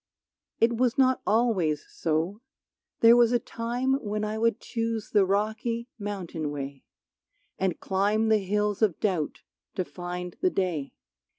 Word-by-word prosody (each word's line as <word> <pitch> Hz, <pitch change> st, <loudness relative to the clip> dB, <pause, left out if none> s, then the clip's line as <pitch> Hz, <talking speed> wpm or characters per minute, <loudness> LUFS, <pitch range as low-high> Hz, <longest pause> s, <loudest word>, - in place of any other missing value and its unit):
It 230 Hz, 0 st, +3 dB
was 250 Hz, +2 st, +2 dB
not 260 Hz, -1 st, +4 dB
always 200 Hz, -10 st, +2 dB
so, 165 Hz, +6 st, -1 dB, 0.6 s
there 230 Hz, +1 st, +8 dB
was 240 Hz, -1 st, +5 dB
a 245 Hz, -, +4 dB
time 245 Hz, +4 st, -2 dB
When 210 Hz, 0 st, -2 dB
I 215 Hz, 0 st, -3 dB
would 230 Hz, 0 st, +2 dB
choose 230 Hz, -2 st, -3 dB
the 200 Hz, -3 st, +4 dB
rocky 220 Hz, +4 st, -1 dB
mountain 185 Hz, -7 st, -4 dB
way, 140 Hz, -2 st, -6 dB, 0.7 s
And 190 Hz, -2 st, 0 dB
climb 205 Hz, +3 st, +1 dB
the 220 Hz, -1 st, +5 dB
hills 210 Hz, +1 st, -1 dB
of 205 Hz, -7 st, +2 dB
doubt 180 Hz, -8 st, -1 dB, 0.3 s
to 185 Hz, -, -1 dB
find 180 Hz, 0 st, -6 dB
the 370 Hz, -, +4 dB
day. 175 Hz, -, -2 dB
210 Hz, 140 wpm, -27 LUFS, 180-230 Hz, 0.7 s, there